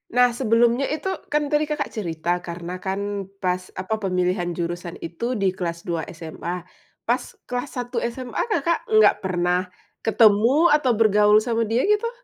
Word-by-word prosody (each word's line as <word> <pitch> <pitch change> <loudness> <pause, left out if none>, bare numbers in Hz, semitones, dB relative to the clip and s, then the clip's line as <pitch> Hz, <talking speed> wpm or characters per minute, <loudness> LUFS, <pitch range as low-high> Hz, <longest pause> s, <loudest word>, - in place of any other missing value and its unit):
Nah, 245 -1 +5
sebelumnya 235 +2 +2
itu, 310 +5 -4 0.2
kan, 295 0 0
tadi 300 0 +2
Kakak 300 -1 -2
cerita 175 -4 -2
karena, 175 +1 -6
kan, 200 0 -3
pas 180 -1 -2
apa, 215 +4 -2
pemilihan 180 -1 0
jurusan 175 0 -4
itu 235 +9 -3
di 195 -2 +1
kelas 170 -2 -4
2 170 -2 -1 0.2
SMA, 170 +2 -6 0.4
pas - - +1 0.2
kelas 245 +3 -3
1 245 -1 -2
SMA, 250 0 -4
Kakak 340 -5 0
nggak 215 -1 +6
pernah 180 0 0 0.3
ketemu, 230 +9 +4
atau 295 -4 +3
bergaul 210 -1 +5
sama 230 -1 0
dia, 235 +3 +2
gitu? 420 +3 +2
210 Hz, 150 wpm, -23 LUFS, 180-245 Hz, 0.4 s, nggak